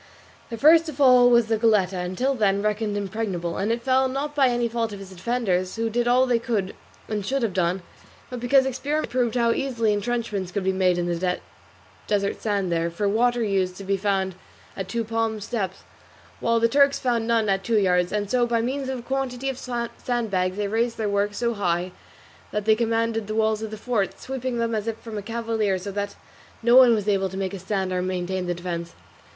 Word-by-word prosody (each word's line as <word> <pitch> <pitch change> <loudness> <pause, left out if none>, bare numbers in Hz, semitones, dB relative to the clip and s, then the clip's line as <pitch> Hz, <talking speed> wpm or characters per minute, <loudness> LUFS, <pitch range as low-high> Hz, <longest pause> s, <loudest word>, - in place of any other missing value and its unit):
The 230 - -5
first 325 +5 +6
to 310 - -4
fall 255 -3 +6
was 235 -1 +5
the 220 -1 0
Goletta, 200 -5 +2
until 185 +10 -1
then 200 -4 +1
reckoned 210 0 -1
impregnable, 195 -4 -3
and 205 +3 0
it 235 0 -2
fell, 265 +1 +3
not 275 +3 -3
by 280 -3 +4
any 240 -1 +1
fault 230 -1 -2
of 200 - -7
its 195 -1 -10
defenders, 185 -2 -1
who 225 0 -1
did 240 +1 0
all 250 +2 +4
that 250 - 0
they 230 - +3
could 220 -5 -2 0.3
and 210 -2 -2
should 265 +5 -1
have 220 -5 0
done, 180 0 0 0.5
but 250 - -4
because 265 +3 +4
experiment 280 +4 -2
proved 245 -2 0
how 235 -1 +3
easily 230 -4 0
entrenchments 205 -3 -2
could 200 +1 -2
be 190 - +2
made 185 -1 +2
in 175 - 0
the 175 +1 -1 0.7
desert 200 -1 0
sand 200 -4 -1
there; 165 0 0
for 185 +5 -2
water 240 +3 +2
used 190 -3 0
to 195 - -9
be 195 +1 0
found 195 -1 0 0.4
at 195 -1 -5
two 230 +4 -2
palms 225 -1 -2
depth, 195 -5 -3 0.6
while 230 0 +2
the 230 - +4
Turks 280 +3 +4
found 235 -3 0
none 230 -2 +2
at 195 -1 +1
two 225 +2 +1
yards; 180 -3 +2
and 210 -1 -1
so 240 +3 +2
by 235 -1 +1
means 265 +3 -2
of 265 - -2
a - - -7
quantity 270 0 -2
of 265 - -4 0.4
sandbags 200 -7 -1
they 205 -1 -1
raised 230 +3 0
their 215 -2 -1
works 200 0 0
so 235 -1 0
high 180 -3 -1 0.6
that 210 -1 -3
they 220 - +6
commanded 225 -1 0
the 215 - -3
walls 220 -1 +1
of 220 - -4
the 215 - -7
fort, 215 -3 -1
sweeping 260 -2 -4
them 230 0 -1
as 215 0 -2
if 225 -1 -2
from 225 -1 -9
a - - -6
cavalier, 225 -2 -1
so 190 +2 -6
that 205 0 -4 0.5
no 235 +1 +5
one 255 -3 +8
was 210 -1 -3
able 195 -2 +1
to 190 - -7
make 195 0 -2
a 195 - -5
stand 190 0 -2
or 180 - 0
maintain 185 0 -2
the 175 - -1
defence. 170 -1 -5
220 Hz, 220 wpm, -24 LUFS, 195-240 Hz, 0.7 s, one